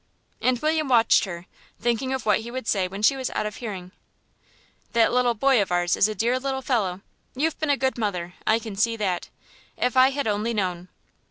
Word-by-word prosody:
And 255 Hz, 0 st, +2 dB
William 310 Hz, -1 st, +1 dB
watched 230 Hz, -4 st, +4 dB
her, 175 Hz, -2 st, -7 dB, 0.3 s
thinking 240 Hz, +3 st, 0 dB
of 265 Hz, -1 st, -3 dB
what 210 Hz, -, +3 dB
he 225 Hz, +2 st, -7 dB
would 255 Hz, -1 st, -6 dB
say 190 Hz, -3 st, +1 dB
when 195 Hz, +3 st, -7 dB
she 275 Hz, -, +5 dB
was 260 Hz, -1 st, -3 dB
out -, -, 0 dB
of 210 Hz, 0 st, -5 dB
hearing. 190 Hz, -6 st, -6 dB, 1.0 s
"That 230 Hz, -1 st, +4 dB, 0.3 s
boy 270 Hz, -3 st, +4 dB
of 195 Hz, -, -2 dB
ours 175 Hz, 0 st, +2 dB
is 195 Hz, -, +4 dB
a 215 Hz, -, -4 dB
dear 235 Hz, +5 st, +1 dB
little 265 Hz, 0 st, -3 dB
fellow; 200 Hz, -8 st, -1 dB, 0.3 s
you've 310 Hz, +4 st, -1 dB
been 310 Hz, -, -1 dB
a 285 Hz, -, +3 dB
good 260 Hz, -1 st, -1 dB
mother, 180 Hz, -5 st, -2 dB
I 220 Hz, -, +4 dB
can 225 Hz, -3 st, -7 dB
see 230 Hz, +3 st, +1 dB
that. 190 Hz, -5 st, -2 dB, 0.5 s
If 250 Hz, -, 0 dB
I 260 Hz, +1 st, +6 dB
had 280 Hz, +1 st, -3 dB
only 215 Hz, +2 st, -1 dB
known." 180 Hz, -3 st, -2 dB
225 Hz, 205 wpm, -24 LUFS, 195-260 Hz, 1.0 s, I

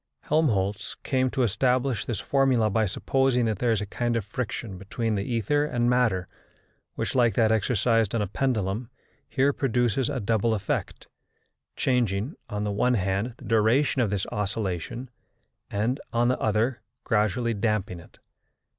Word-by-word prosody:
Helmholtz 105 Hz, -11 st, 0 dB
came 130 Hz, -1 st, +1 dB
to 130 Hz, -, 0 dB
establish 125 Hz, +1 st, +1 dB
this 115 Hz, -7 st, -2 dB
formula 130 Hz, -6 st, +2 dB
by 110 Hz, +1 st, +2 dB
supposing 130 Hz, +5 st, +1 dB
that 110 Hz, -4 st, -1 dB
there 120 Hz, -2 st, +2 dB
is 110 Hz, -2 st, +1 dB
a -, -, -2 dB
kind 120 Hz, +4 st, -1 dB
of 115 Hz, -4 st, -1 dB
friction 105 Hz, -3 st, -4 dB
between 110 Hz, +3 st, -2 dB
the 100 Hz, -, 0 dB
ether 120 Hz, +6 st, +1 dB
and 120 Hz, -5 st, +1 dB
matter, 110 Hz, -8 st, +2 dB, 0.7 s
which, -, -, -2 dB
like 120 Hz, -3 st, +3 dB
that 110 Hz, -3 st, +3 dB
exercised 115 Hz, 0 st, +2 dB
on 115 Hz, -, +1 dB
a -, -, 0 dB
pendulum, 110 Hz, 0 st, -1 dB, 0.4 s
here 140 Hz, +2 st, +2 dB
produces 120 Hz, -2 st, +1 dB
a 140 Hz, -3 st, -2 dB
double 110 Hz, +1 st, +1 dB
effect, 100 Hz, -2 st, -3 dB, 0.7 s
changing, 120 Hz, -, 0 dB, 0.2 s
on 105 Hz, 0 st, -3 dB
the 105 Hz, -, -1 dB
one 125 Hz, +5 st, +2 dB
hand, 100 Hz, +4 st, -1 dB
the -, -, -13 dB
duration 115 Hz, +5 st, +3 dB
of 115 Hz, -, +1 dB
this 100 Hz, -2 st, -1 dB
oscillation, 105 Hz, +3 st, -3 dB, 0.6 s
and, 115 Hz, +6 st, -1 dB
on 120 Hz, +1 st, +2 dB
the 130 Hz, -, 0 dB
other, 110 Hz, +2 st, 0 dB, 0.2 s
gradually 110 Hz, +2 st, +1 dB
damping 105 Hz, -3 st, -1 dB
it. 85 Hz, -, -17 dB
115 Hz, 155 wpm, -26 LUFS, 105-125 Hz, 0.7 s, like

